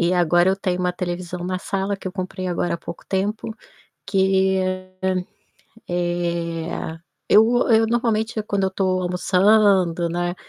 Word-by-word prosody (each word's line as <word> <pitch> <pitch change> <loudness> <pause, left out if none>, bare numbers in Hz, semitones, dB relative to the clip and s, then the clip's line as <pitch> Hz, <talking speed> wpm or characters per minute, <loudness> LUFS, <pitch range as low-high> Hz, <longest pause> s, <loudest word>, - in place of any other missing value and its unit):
E 175 +1 +2
agora 175 +1 +3
eu 190 - +3
tenho 185 -2 -2
uma 180 0 0
televisão 175 0 -4
na 185 0 -2
sala, 195 +1 -2
que 195 - -11
eu 185 - -3
comprei 185 -1 -5
agora 175 -1 -1
há - - -5
pouco 170 - -9
tempo, 205 +4 -2 0.5
que, 190 0 +2 0.4
hã, 185 -1 0 0.6
eh, 170 -2 -2 0.3
eu 230 +4 +5
eu 225 0 +5
normalmente, 225 -2 0
quando 200 -2 -1
eu 190 - 0
tô 185 -1 0
almoçando, 180 -1 +3
né, 175 +1 -2
185 Hz, 150 wpm, -22 LUFS, 175-195 Hz, 0.6 s, eu